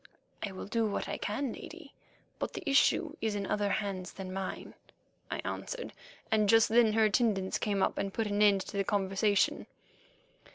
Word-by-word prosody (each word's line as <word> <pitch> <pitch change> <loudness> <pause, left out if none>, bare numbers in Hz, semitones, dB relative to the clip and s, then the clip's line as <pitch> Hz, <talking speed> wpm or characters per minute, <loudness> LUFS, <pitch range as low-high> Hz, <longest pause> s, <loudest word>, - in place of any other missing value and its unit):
"I 205 - -3
will 185 - -7
do 225 +2 0
what 200 - -2
I - - -4
can, 240 +4 -2
Lady, 325 -4 -11 0.5
but - - -3
the - - -7
issue 295 +3 +3
is 220 -2 0
in 200 -1 -2
other 205 0 0
hands 195 -3 -2
than 185 -1 -7
mine," 190 0 -5 0.6
I - - -2
answered, - - -5 0.4
and 215 -2 +3
just 225 0 +6
then 225 -1 +5
her 220 0 +4
attendants 210 -3 +1
came 200 -2 0
up - - 0
and 195 0 -2
put 225 +3 -1
an 205 0 0
end 200 -2 +5
to 200 - -6
the 195 - +2
conversation. 200 +1 +1
210 Hz, 180 wpm, -31 LUFS, 195-225 Hz, 0.6 s, just